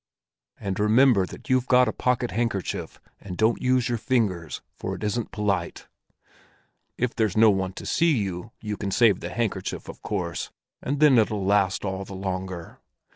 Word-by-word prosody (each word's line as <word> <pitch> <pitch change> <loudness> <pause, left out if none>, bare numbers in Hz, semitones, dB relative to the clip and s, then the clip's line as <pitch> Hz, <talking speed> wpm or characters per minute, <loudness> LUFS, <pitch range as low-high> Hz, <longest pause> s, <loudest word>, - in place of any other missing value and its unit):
And 100 -2 -3
remember 110 -2 +4
that - - -11
you've 130 -1 +2
got 125 0 +5
a 110 - -1
pocket 125 -1 0
handkerchief, 115 -4 -2 0.2
and 90 -3 -8
don't 110 +2 +2
use 125 -1 +2
your 120 -2 -1
fingers, 100 - -1
for - - -5
that - - -5
isn't 110 +2 -2
polite. 100 -5 -2 1.1
If 125 -1 0
there's 110 -3 0
no 110 -1 +7
one 95 -1 -1
to - - -8
see 165 -4 +2
you, 95 0 -3
you 105 -2 -4
can 100 - -3
save 105 -1 +4
the 85 - -5
handkerchief, 115 +3 -3
of - - -10
course, 90 -5 -3 0.3
and 140 +2 -2
then 145 -5 +6
it'll 105 -3 0
last 100 0 +2
all 95 0 -3
the 95 - -9
longer. 95 -2 -5
105 Hz, 175 wpm, -25 LUFS, 95-120 Hz, 1.1 s, no